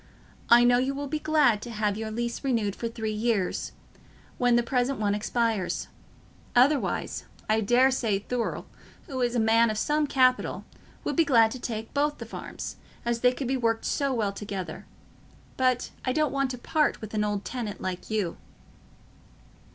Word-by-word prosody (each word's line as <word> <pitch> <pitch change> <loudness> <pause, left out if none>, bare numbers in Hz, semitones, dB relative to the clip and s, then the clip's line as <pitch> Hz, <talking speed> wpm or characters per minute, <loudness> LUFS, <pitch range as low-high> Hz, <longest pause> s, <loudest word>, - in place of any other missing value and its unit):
I 240 0 +8
know 245 0 +5
you 265 +2 0
will 285 +1 -3
be 305 +2 -2
glad 290 -9 +3
to 240 - -7
have 210 -2 -1
your 220 +1 -4
lease 235 +3 -3
renewed 225 -7 0
for 230 - -3
three 220 -1 -3
years, 215 -3 -1 0.7
when 245 -2 +4
the 240 - +3
present 250 +2 0
one 205 -1 +1
expires; 215 -2 -1 0.7
otherwise, 270 +4 +2 0.2
I 220 +1 +2
daresay 245 -1 +3
Thurle, 235 +4 -3 0.4
who 260 -2 -4
is 240 0 +1
a - - +2
man 225 +1 +4
of 215 - -2
some 300 +5 +1
capital, 255 -2 +2 0.4
would - - -2
be 330 - +5
glad 230 -7 +5
to 255 - -6
take 225 -2 -5
both 295 +1 +1
the - - -7
farms, - - -7 0.3
as 235 0 0
they 250 +1 +4
could 255 0 -4
be 265 - +1
worked 230 -2 0
so 280 -2 0
well 215 -5 0
together. 195 -3 -6 0.7
But 255 -1 +1
I 255 - 0
don't 305 -1 +1
want 275 -1 +1
to 250 - -4
part 300 +5 +1
with 215 -1 -8
an 210 -1 +1
old 205 -1 -2
tenant 225 -6 -4
like 185 -1 -5
you." 210 -6 -1
235 Hz, 175 wpm, -27 LUFS, 215-260 Hz, 0.7 s, I